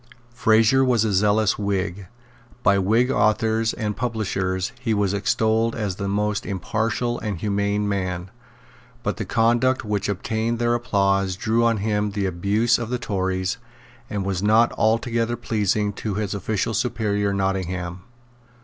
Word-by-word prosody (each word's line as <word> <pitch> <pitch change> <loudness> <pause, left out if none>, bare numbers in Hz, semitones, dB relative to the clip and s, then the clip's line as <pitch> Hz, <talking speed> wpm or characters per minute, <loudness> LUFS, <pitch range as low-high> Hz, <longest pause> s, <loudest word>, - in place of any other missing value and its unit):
Fraser 115 +3 +4
was 120 -4 +2
a 105 - 0
zealous 105 +2 +2
Whig. 100 -2 -2 0.6
By 100 -1 +4
Whig 115 +7 +2
authors 110 -1 +2
and 105 -3 -3
publishers 95 -5 -2
he 115 -3 0
was 100 -1 +1
extolled 110 +2 +1
as 100 -4 -3
a 100 - -1
most 105 +1 0
impartial 110 +4 -2
and 105 -4 -3
humane 100 +2 0
man. 95 -2 -3 0.7
But - - -2
the 110 - -3
conduct 120 +4 +2
which 105 -1 -1
obtained 110 +4 -1
their 120 0 +1
applause 100 -5 +1
drew 115 +4 +1
on 115 -1 +3
him 105 0 0
the 100 -1 -1
abuse 100 +6 +1
of 120 -1 -4
the 125 - -1
Tories, 95 -3 -2 0.5
and 100 -2 -3
was 95 -2 -1
not 110 +3 +4
altogether 115 +1 +1
pleasing 105 -3 0
to 100 0 -4
his 105 -1 -2
official 105 +2 -2
superior 105 -3 0
Nottingham. 95 -2 -2
105 Hz, 145 wpm, -23 LUFS, 100-115 Hz, 0.7 s, Fraser